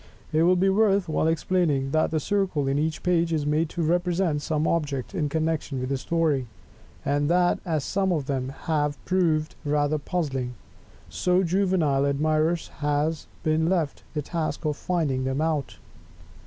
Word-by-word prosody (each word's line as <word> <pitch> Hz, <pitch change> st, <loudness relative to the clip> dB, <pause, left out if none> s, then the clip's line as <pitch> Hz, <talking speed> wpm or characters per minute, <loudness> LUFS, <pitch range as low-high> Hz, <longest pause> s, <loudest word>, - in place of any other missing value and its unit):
It 155 Hz, -, +3 dB
will 180 Hz, +2 st, +5 dB
be 185 Hz, +2 st, +2 dB
worth 200 Hz, -1 st, +3 dB
while 155 Hz, 0 st, +1 dB
explaining, 160 Hz, -5 st, +1 dB
that 155 Hz, +1 st, +2 dB
the 160 Hz, -, 0 dB
circle 185 Hz, -5 st, 0 dB
in 135 Hz, +1 st, +1 dB
each 155 Hz, +1 st, -2 dB
page 170 Hz, -2 st, +2 dB
is 155 Hz, -3 st, 0 dB
made 150 Hz, +2 st, +1 dB
to 170 Hz, -, -3 dB
represent 175 Hz, -1 st, +1 dB
some 155 Hz, +1 st, 0 dB
object 145 Hz, -7 st, -1 dB
in 150 Hz, -2 st, -1 dB
connection 155 Hz, -3 st, -1 dB
with 130 Hz, 0 st, -3 dB
the 135 Hz, -, 0 dB
story; 155 Hz, -5 st, 0 dB, 0.6 s
and, 145 Hz, +1 st, +1 dB
that 175 Hz, 0 st, +3 dB
as 155 Hz, -4 st, 0 dB
some 195 Hz, +3 st, 0 dB
of 155 Hz, -6 st, 0 dB
them 130 Hz, -2 st, -2 dB
have 150 Hz, -2 st, 0 dB
proved 165 Hz, -4 st, +1 dB
rather 145 Hz, 0 st, +1 dB
puzzling, 135 Hz, -7 st, -2 dB, 0.6 s
to 180 Hz, +1 st, +2 dB
Juvenile 170 Hz, -6 st, +2 dB
admirers 155 Hz, +4 st, +1 dB
has 150 Hz, +2 st, 0 dB, 0.2 s
been 160 Hz, +1 st, +2 dB
left 165 Hz, -6 st, 0 dB
the 150 Hz, -, -1 dB
task 160 Hz, +2 st, -3 dB
of 150 Hz, -1 st, 0 dB
"finding 145 Hz, -7 st, -1 dB
them 130 Hz, +1 st, -1 dB
out." 155 Hz, -3 st, -1 dB
155 Hz, 165 wpm, -25 LUFS, 145-175 Hz, 0.6 s, will